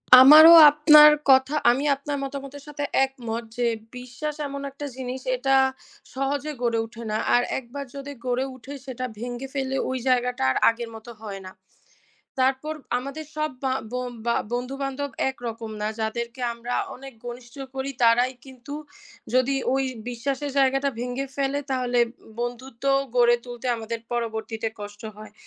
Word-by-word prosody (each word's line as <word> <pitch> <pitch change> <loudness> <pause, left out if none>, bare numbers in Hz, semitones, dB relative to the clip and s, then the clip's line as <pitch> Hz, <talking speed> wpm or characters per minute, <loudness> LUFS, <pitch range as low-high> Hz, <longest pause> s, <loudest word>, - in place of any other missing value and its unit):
আমারও 305 +6 +10 0.2
আপনার 300 0 +8 0.2
কথা, 265 +2 +5 0.2
আমি 265 +4 -1
আপনার 285 +1 -4
মতামতের 275 0 -7
সাথে 290 -1 -5 0.2
একমত 235 -4 -6
যে, 245 - +1 0.3
বিশ্বাস 250 +5 -5
এমন 280 0 -6
একটা 285 +2 -7
জিনিস 260 0 -5
এটা 270 +2 +2 0.6
সহজে 275 +3 -2
গড়ে 235 -2 +1
ওঠে 230 +1 -11
না। 215 - 0 0.2
আর 245 - +5 0.2
একবার 265 +3 -8
যদি 280 +1 -7
গড়ে 250 +1 0
ওঠে 260 +3 -10
সেটা 255 -1 -5
ভেঙে 245 +2 -5
ফেললে 270 -1 -2
ওই 260 - -1
জায়গাটা 250 - +1
আর - - -1
আগের 230 0 -4
মত 220 +1 -12
হয় 200 -3 -7
না। - - -9 0.9
তারপর 265 +4 +1 0.2
আমাদের 275 +5 -6
সব 305 0 -1
বা 260 - +1 0.2
ব - - -5 0.3
বা 235 - +2 0.2
বন্ধু-বান্ধব 275 +3 -3 0.2
একরকম 230 -3 -7
না। 210 - 0
যাদেরকে 235 +3 -3
আমরা 235 +1 -5 0.2
অনেক 270 +1 -10
ঘনিষ্ঠ 240 0 -9 0.2
করি, 270 +1 -3
তারাই 240 +2 +4
কিন্তু 265 +1 -10 0.6
যদি 255 +2 +3 0.2
ওই 270 - +1 0.3
বিশ্বাসের 270 +4 -3
জায়গাটা 270 +1 +3
ভেঙে 250 +3 -3
ফেলে 280 0 0
তাহলে 250 -2 0 0.4
বন্ধুত্ব 240 +1 -6 0.3
গড়ে 240 0 +5
তুলতে 245 0 -8
আমাদের 230 +1 -5
পরবর্তীতে 225 -1 -3
কষ্ট 205 0 -9
হয়। 215 -1 -11
255 Hz, 150 wpm, -24 LUFS, 240-275 Hz, 0.9 s, আমারও